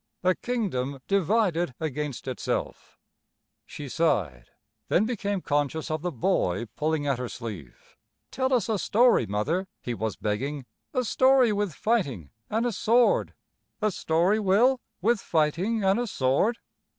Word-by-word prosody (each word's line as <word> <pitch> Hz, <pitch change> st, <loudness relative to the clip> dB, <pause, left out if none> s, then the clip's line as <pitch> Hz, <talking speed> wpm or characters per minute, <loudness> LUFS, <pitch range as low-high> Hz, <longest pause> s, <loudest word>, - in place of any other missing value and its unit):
A 185 Hz, 0 st, +4 dB
kingdom 170 Hz, -, -2 dB
divided 190 Hz, -, +1 dB
against 150 Hz, -3 st, -4 dB
itself. 130 Hz, -, -4 dB, 0.7 s
She 145 Hz, -, -8 dB
sighed, 90 Hz, -, 0 dB, 0.4 s
then 205 Hz, -, +3 dB
became 205 Hz, -4 st, -2 dB
conscious 145 Hz, +2 st, -1 dB
of 155 Hz, -1 st, -2 dB
the 180 Hz, +1 st, -2 dB
boy 115 Hz, -, 0 dB
pulling 155 Hz, -1 st, 0 dB
at 140 Hz, -3 st, 0 dB
her 125 Hz, -1 st, -4 dB
sleeve. 105 Hz, -, -9 dB, 0.3 s
"Tell 260 Hz, 0 st, -1 dB
us 245 Hz, -5 st, +2 dB
a 220 Hz, -3 st, 0 dB
story, 235 Hz, -, +3 dB
Mother," 150 Hz, -, -1 dB
he 120 Hz, -, -4 dB
was 110 Hz, -1 st, -3 dB
begging, 130 Hz, +7 st, -3 dB, 0.3 s
"a 255 Hz, -2 st, 0 dB
story 260 Hz, -1 st, +4 dB
with 205 Hz, -6 st, -2 dB
fighting 140 Hz, -, -1 dB, 0.2 s
an' 225 Hz, +3 st, 0 dB
a 240 Hz, -, +1 dB
sword." 235 Hz, +3 st, +2 dB, 0.4 s
"A 215 Hz, -1 st, +1 dB
story, 175 Hz, +5 st, +1 dB
Will, 230 Hz, +6 st, +3 dB, 0.2 s
with 230 Hz, +1 st, +3 dB
fighting 175 Hz, +8 st, 0 dB
and 195 Hz, +3 st, +3 dB
a 245 Hz, -, -1 dB
sword?" 165 Hz, -, +1 dB
175 Hz, 140 wpm, -26 LUFS, 135-220 Hz, 0.7 s, A